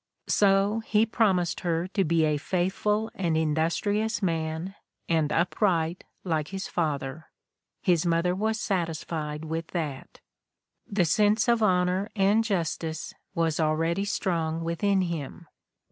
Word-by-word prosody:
So 200 +2 +3
he 220 0 +2
promised 190 -6 +1
her 170 -1 -1
to 195 0 +1
be 165 -1 +2
a 150 -1 +1
faithful 200 +6 0
and 170 -4 0
industrious 170 +8 0
man, 165 0 -2 0.3
and 160 -3 +1
upright, 175 -1 +1 0.2
like 160 -4 -1
his 190 0 -5
father. 150 -2 -2 0.6
His 175 -3 +3
mother 170 +1 +2
was 220 +3 -1
satisfied 160 -5 -2
with 160 +1 -3
that. 150 -6 -4 0.7
The 195 -3 +1
sense 210 +7 +3
of 235 -1 +3
honor 185 0 +2
and 205 +2 +3
justice 165 -5 -2 0.2
was 165 -2 0
already 165 +4 +1
strong 165 -5 -1
within 190 +4 +1
him. 170 -1 -5
175 Hz, 125 wpm, -27 LUFS, 160-200 Hz, 0.7 s, So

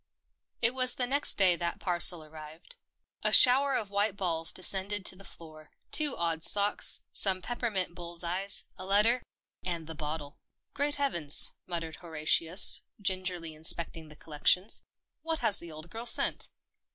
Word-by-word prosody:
It 230 +2 +2
was 255 -1 +1
the 250 - +1
next 280 +4 +2
day 185 -3 +3
that 170 0 -5
parcel 175 -2 +2
arrived. 155 - -10 0.4
A - - 0
shower 270 +2 +4
of 205 -3 -4
white 200 0 -1
balls 165 -4 -1
descended 190 +2 +1
to - - +1
the 195 - -16
floor, 155 -4 -14 0.2
two 300 -3 +2
odd 165 -1 -3
socks, 205 +4 +2
some 190 -2 +4
peppermint 205 -4 -4
bull's 175 -1 0
eyes, 185 +4 0 0.2
a - - -8
letter, 215 +5 +2 0.4
and 170 -3 -6
the 160 - -9
bottle. 150 -1 -8 0.2
" - - -60
Great 290 +1 -2
Heavens! 170 - +4
" - - -62
muttered 165 -2 -6
Horatius, 165 +2 +3 0.2
gingerly 185 -4 -4
inspecting 160 +1 -3
the 150 - -15
collection. 165 +7 -1 0.3
" - - -62
What 325 0 -4
has 205 - 0
the 170 -1 -12
old 155 +2 -11
girl 230 +2 -7
sent - - +2
180 Hz, 165 wpm, -28 LUFS, 165-205 Hz, 0.4 s, shower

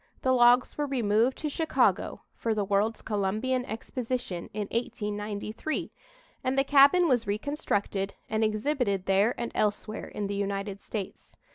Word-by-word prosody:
The 260 - +3
logs 245 +2 +4
were 295 - +1
removed 235 -1 +2
to 310 - -3
Chicago, 320 +2 +1
for 225 -1 -1
the 205 -2 0
World's 205 +3 0
Columbian 215 +5 0
Exposition, 230 -5 -4
in 205 -1 -3
1893, 210 +3 -3 0.5
and 260 +1 0
the 270 - +5
cabin 285 +6 +6
was 245 -6 +2
reconstructed 205 -4 -1
and 220 +1 0
exhibited 215 -3 0
there 200 +5 +2
and 235 - -3
elsewhere 215 +1 -1
in 210 - -4
the 200 - -3
United 200 0 -3
States. 200 -4 -7
220 Hz, 140 wpm, -28 LUFS, 205-255 Hz, 0.5 s, cabin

